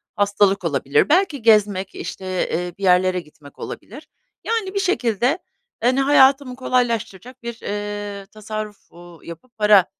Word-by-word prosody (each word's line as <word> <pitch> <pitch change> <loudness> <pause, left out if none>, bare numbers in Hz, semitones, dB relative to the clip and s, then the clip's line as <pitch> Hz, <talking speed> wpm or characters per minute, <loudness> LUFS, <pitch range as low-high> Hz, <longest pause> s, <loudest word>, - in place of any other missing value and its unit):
hastalık 200 -1 +2
olabilir. 140 - +1
Belki 325 -6 +2
gezmek, 205 -4 +3
işte, 190 - -7 0.2
eee, 175 0 -3
bir 200 - -10
yerlere 185 0 +3
gitmek 150 -3 -16
olabilir. 275 +9 -9 0.4
Yani, 440 -4 -2
bir 400 - 0
şekilde, 265 - +1 0.4
hani, 255 +3 +2
hayatımı 270 -2 +4
kolaylaştıracak 245 -2 -2
bir, 235 -1 -6
eee, 205 -1 -5
tasarruf, 215 0 -8
uuu, 175 -1 -15
yapıp 170 +9 -12
para, 210 -3 +5
210 Hz, 130 wpm, -21 LUFS, 190-255 Hz, 0.4 s, para